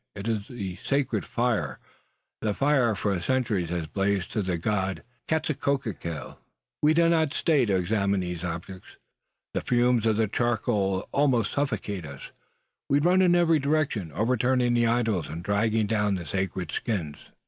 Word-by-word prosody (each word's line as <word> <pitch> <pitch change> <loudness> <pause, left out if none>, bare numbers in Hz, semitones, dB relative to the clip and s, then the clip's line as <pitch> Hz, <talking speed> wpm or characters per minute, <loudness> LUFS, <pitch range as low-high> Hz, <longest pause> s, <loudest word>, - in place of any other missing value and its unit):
It 100 +2 -6
is 110 -3 -1
the 100 -7 -6
sacred 140 0 0
fire 120 -2 0 0.6
the 105 -2 -1
fire 140 0 +3
that 110 - 0
for 100 -2 -1
centuries 110 -6 0
has 85 -2 -2
blazed 95 +2 -1
to 110 - 0
the 90 -3 -1
god 95 +1 -1 0.2
Quetzalcoatl! 135 - -2 0.4
We 155 +1 +4
do 170 0 +5
not 160 -3 +2
stay 150 -6 +3
to 100 -3 +1
examine 100 +1 +1
these 90 -1 -4
objects. 90 +2 -7 0.6
The - - -1
fumes 120 -2 +2
of 110 -1 +2
the 110 -1 +2
charcoal 105 -4 0
almost 130 -7 +2
suffocate 105 - -2
us. 70 -1 -10 0.6
We 140 - +4
run 175 +5 +4
in 175 -1 +5
every 165 -2 +4
direction, 140 - 0
overturning 125 - +2
the 120 -1 +3
idols 115 -8 +1
and 85 +2 -6
dragging 110 +2 +1
down 105 -1 +1
the 90 -2 -5
sacred 90 0 -3
skins. 85 -10 -3
110 Hz, 160 wpm, -26 LUFS, 95-130 Hz, 0.6 s, do